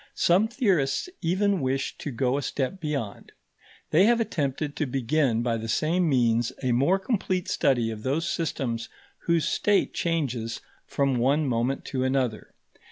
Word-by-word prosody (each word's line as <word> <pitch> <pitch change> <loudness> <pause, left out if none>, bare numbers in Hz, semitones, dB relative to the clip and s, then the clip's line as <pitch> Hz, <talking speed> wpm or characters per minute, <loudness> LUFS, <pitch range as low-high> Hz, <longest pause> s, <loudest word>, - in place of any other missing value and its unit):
Some 185 +6 +3
theorists 195 - 0
even 190 +2 +1
wish 135 +1 -1
to - - -4
go 125 0 0
a 145 - -1
step 140 +7 -3
beyond. 140 -10 -4 0.6
They 175 +6 +5
have 235 +1 +4
attempted 145 - -2
to 155 - 0
begin 130 -2 +1
by 115 -1 0
the 115 0 -5
same 165 +8 +1
means 120 -3 +2
a 130 - +1
more 140 +11 +3
complete 190 -3 -1
study 120 -4 +1
of 110 -1 -7
those 150 +8 -1
systems 125 -8 -2 0.4
whose 170 -3 +2
state 205 -1 +1
changes 130 -9 -2 0.3
from 140 -2 0
one 140 +5 +2
moment 125 +1 -1
to 130 -2 -2
another. 130 -4 -1
140 Hz, 155 wpm, -26 LUFS, 125-170 Hz, 0.6 s, They